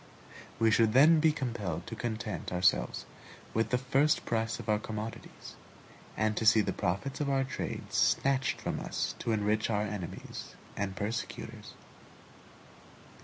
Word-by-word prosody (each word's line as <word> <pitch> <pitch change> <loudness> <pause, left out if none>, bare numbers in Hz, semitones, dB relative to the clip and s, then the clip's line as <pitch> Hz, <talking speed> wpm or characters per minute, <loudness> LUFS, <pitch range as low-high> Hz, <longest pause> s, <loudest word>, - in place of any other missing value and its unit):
We 115 -1 +4
should 110 -1 +4
then 155 +5 +7
be 160 0 +5
compelled 110 - -3
to - - -6
content 110 -4 -4
ourselves 90 -9 +2 0.5
with 115 +1 +1
the 125 - +2
first 135 +4 +2
price 115 -1 -1
of 120 - -8
our 105 -1 +2
commodities, 110 +1 -7 0.6
and 110 0 +1
to - - 0
see 110 0 +7
the - - -1
profits 100 +12 -2
of 145 - 0
our 135 -1 +2
trade 135 - -5
snatched 135 -1 +2
from - - -3
us - - -2
to 115 - -1
enrich 110 0 +1
our 105 -2 +1
enemies 100 -4 -6 0.2
and 95 -1 -2
persecutors. 110 +4 -5
110 Hz, 145 wpm, -31 LUFS, 105-130 Hz, 0.6 s, then